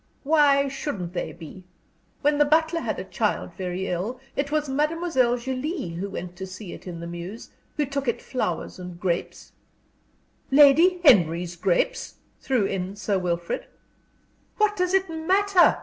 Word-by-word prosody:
"Why 285 -2 +4
shouldn't 210 - -4
they - - -3
be? 170 +2 -11 0.6
When 295 0 +3
the - - +7
butler 320 +3 +2
had - - -3
a - - -4
child - - -2
very 185 0 -4
ill, 195 +9 -3 0.2
it 280 +1 -1
was 300 -1 0
Mademoiselle 295 -3 +1
Julie 265 - -3
who 175 +4 -4
went 180 -2 -6
to 190 +1 -6
see 185 0 -8
it - - -11
in 170 -2 -6
the - - -6
mews, 175 +6 -7 0.3
who 295 - +2
took 275 0 -3
it 235 - 0
flowers 185 -10 -3
and 180 -1 -8
grapes 175 -2 -3 0.5
" - - -39
"Lady 335 +6 +6
Henry's 175 - +5
grapes?" - - 0 0.2
threw 250 -7 +1
in 190 0 -3
Sir 205 -1 -1
Wilfrid. 175 -1 -2 0.9
"What 425 -1 +2
does 365 -1 +1
it 385 0 +2
matter!" 365 +3 +3
255 Hz, 160 wpm, -25 LUFS, -, 0.9 s, the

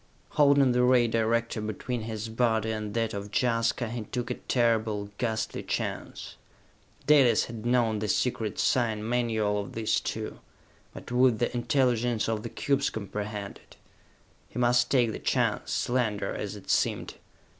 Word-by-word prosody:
Holding 140 -3 +4
the 125 0 +2
ray 125 -1 +4
director 115 0 0
between 110 +3 -4
his 110 0 -5
body 110 -1 +1
and 105 -1 -4
that 115 -1 0
of 100 0 -5
Jaska, 115 +1 +1
he 120 -1 -4
took 125 +2 -4
a - - +1
terrible, 110 -5 0
ghastly 110 -2 -2
chance. - - -4 0.7
Dalis 140 -5 +5
had 115 0 -6
known 120 -3 +2
the 105 - -2
secret 110 -1 -1
sign 110 -4 +1
manual 110 -4 0
of 100 - -9
these 110 -1 +1
two; - - -5 0.5
but - - -10
would 125 -2 +4
the 120 +2 -1
intelligence 120 -3 +1
of 110 -1 -1
the 115 - -6
cubes 140 +2 0
comprehend 105 -1 -5
it? - - -20 0.7
He - - -10
must 120 0 +3
take 120 -4 +3
the - - -6
chance, - - 0
slender 110 -5 0
as 105 0 -4
it 100 - -5
seemed. - - 0
115 Hz, 155 wpm, -28 LUFS, 110-125 Hz, 0.7 s, Dalis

